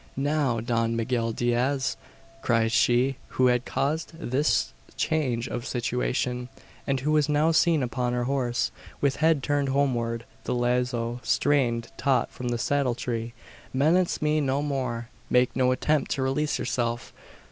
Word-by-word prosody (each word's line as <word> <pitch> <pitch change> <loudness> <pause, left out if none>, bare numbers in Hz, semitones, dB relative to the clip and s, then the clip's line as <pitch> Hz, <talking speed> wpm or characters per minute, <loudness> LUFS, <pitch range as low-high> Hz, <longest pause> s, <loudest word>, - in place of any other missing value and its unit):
"Now, 140 -4 +1
Don 115 0 0
Miguel 115 0 0
Diaz!" 120 +4 0 0.5
cried 115 -2 +2
she 125 +3 +3 0.2
who 130 - +4
had 125 0 +3
caused 155 +4 -1
this 135 - +1 0.2
change 130 -7 0
of 120 - -4
situation, 125 0 -2 0.4
and 135 -2 0
who 150 +3 0
was 150 -1 +3
now 150 +2 +3
seen 160 -2 +3
upon 125 0 -1
her 125 0 0
horse, 125 -2 0 0.3
with 140 -1 +1
head 160 -3 +3
turned 145 -1 0
homeward, 120 -4 0 0.2
the - - -1
lazo 120 -1 0
strained 120 -6 +1
taut 135 -2 +1
from 125 - -6
the 120 0 0
saddle 135 0 +1
tree. 115 -1 -3 0.4
"Menace 160 +6 +2
me 155 0 +2
no 140 +1 0
more! 125 -5 -3 0.2
Make 125 0 +3
no 130 0 +3
attempt 150 +2 +1
to 135 - -2
release 145 +3 0
yourself. 120 -1 -2
125 Hz, 145 wpm, -26 LUFS, 120-140 Hz, 0.5 s, who